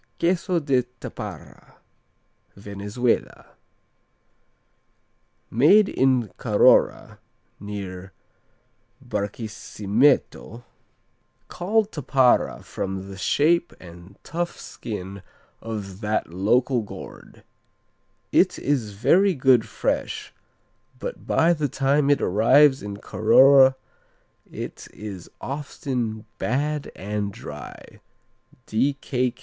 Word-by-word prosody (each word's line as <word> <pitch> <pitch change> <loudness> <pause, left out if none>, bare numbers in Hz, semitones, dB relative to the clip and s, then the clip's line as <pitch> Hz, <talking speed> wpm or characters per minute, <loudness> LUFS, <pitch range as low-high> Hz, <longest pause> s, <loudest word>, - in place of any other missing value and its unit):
Queso 175 +1 +1
de 140 -5 +1 0.2
Tapara - - -9 0.8
Venezuela 100 +4 -3 2.0
Made 195 - +5
in 130 -5 +1
Carora, - - +3 0.4
near 95 -2 -7 1.0
Barqisimeto, 110 +3 -1 0.9
called 210 +4 0
tapara 135 -4 +2
from 95 0 -5
the - - -8
shape 160 - +2
and 90 +2 -14
tough 170 +2 -4
skin 100 -3 -7 0.4
of 105 -3 -6
that 105 -5 -2
local 120 +7 +2
gourd. 105 - -11 0.9
"It - - +3
is 125 -8 -1
very 170 - +3
good 130 -4 +3
fresh, - - -3 0.6
but - - -7
by 170 +2 +3
the 150 -3 -2
time 140 +3 +1
it 145 - +3
arrives 130 +8 +4
in 100 -1 -6
Carora 130 +6 +5 0.8
it - - -7
is 100 -4 -8
often 130 -6 -4
bad 145 +4 -2
and 100 0 -3
dry." - - -10
120 Hz, 80 wpm, -24 LUFS, 100-145 Hz, 2.0 s, Made